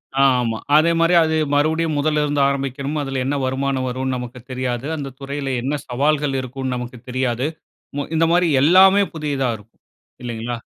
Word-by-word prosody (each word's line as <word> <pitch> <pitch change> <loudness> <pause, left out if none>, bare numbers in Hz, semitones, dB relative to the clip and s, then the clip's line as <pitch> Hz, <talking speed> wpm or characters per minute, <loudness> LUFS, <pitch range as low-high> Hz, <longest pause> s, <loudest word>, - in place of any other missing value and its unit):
ஆ, 135 - +2 0.2
ஆமா. 115 -2 -1 0.2
அதேமாரி 165 +2 +4
அது 160 0 0 0.2
மறுபடியும் 155 +1 +1
முதல்ல 150 +1 +1
இருந்து 145 -1 0
ஆரம்பிக்கணும். 140 +2 -3
அதுல 135 -1 -3
என்ன 140 +2 0
வருமானம் 130 0 -1
வருன்னு 130 +1 -2
நமக்கு 125 0 -7
தெரியாது. 125 -1 -3
அந்த 140 -2 -5
துறையில 140 0 -4
என்ன 140 +4 -1
சவால்கள் 145 +2 +1
இருக்குன்னு 130 0 -4
நமக்கு 125 0 -6
தெரியாது. 125 0 -1 0.5
மு 145 - -1
இந்த 165 +1 +3
மாரி 175 0 +3
எல்லாமே 190 +6 +6
புதிதா 145 -5 -1
இருக்கும், 105 +2 -22 0.4
இல்லங்களா? 120 0 -4
135 Hz, 155 wpm, -20 LUFS, 125-150 Hz, 0.5 s, எல்லாமே